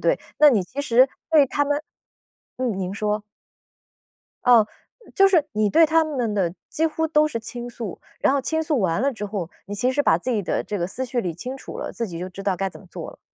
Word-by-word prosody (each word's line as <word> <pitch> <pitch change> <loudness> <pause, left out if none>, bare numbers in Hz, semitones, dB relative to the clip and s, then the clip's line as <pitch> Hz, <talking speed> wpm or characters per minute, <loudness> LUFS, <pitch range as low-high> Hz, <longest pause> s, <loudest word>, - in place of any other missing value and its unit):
对， - - +2 0.2
那 300 - +8
你 215 -8 +2
其 260 +10 -6
实 255 -1 +5 0.2
对 305 -3 +7
他 290 +2 0
们 290 +1 0 0.8
嗯， 245 -6 -1
您 190 0 -3
说。 210 0 -1 1.2
哦。 235 -4 +6 0.5
就 390 - +6
是 345 -6 +3
你 210 -1 +1
对 325 +5 +6
他 320 +1 +3
们 250 -8 -2
的 185 -5 +1 0.2
几 320 - -1
乎 320 +1 -1
都 305 -1 +3
是 235 -7 -3
倾 240 +2 -7
诉。 225 -5 -6 0.2
然 - - +3
后 280 - +2
倾 320 +4 0
诉 305 -3 0
完 185 -3 +1
了 275 +3 +2
之 210 -3 -6
后， 195 -5 -4 0.2
你 205 +2 -6
其 250 +5 +1
实 290 +3 +1
把 165 - +4
自 255 - -3
己 215 -4 0
的 - - -1
这 205 - -4
个 175 - -1
思 260 +7 -4
绪 245 -1 -1
理 180 -6 -2
清 255 +10 -6
楚 - - -9
了， - - -4
自 230 - -3
己 170 -3 -7
就 180 - -4
知 195 +2 -9
道 195 -2 0
该 195 +1 -1
怎 - - -13
么 195 - -17
做 - - -7
了。 - - -17
235 Hz, 260 characters per minute, -23 LUFS, 195-290 Hz, 1.2 s, 那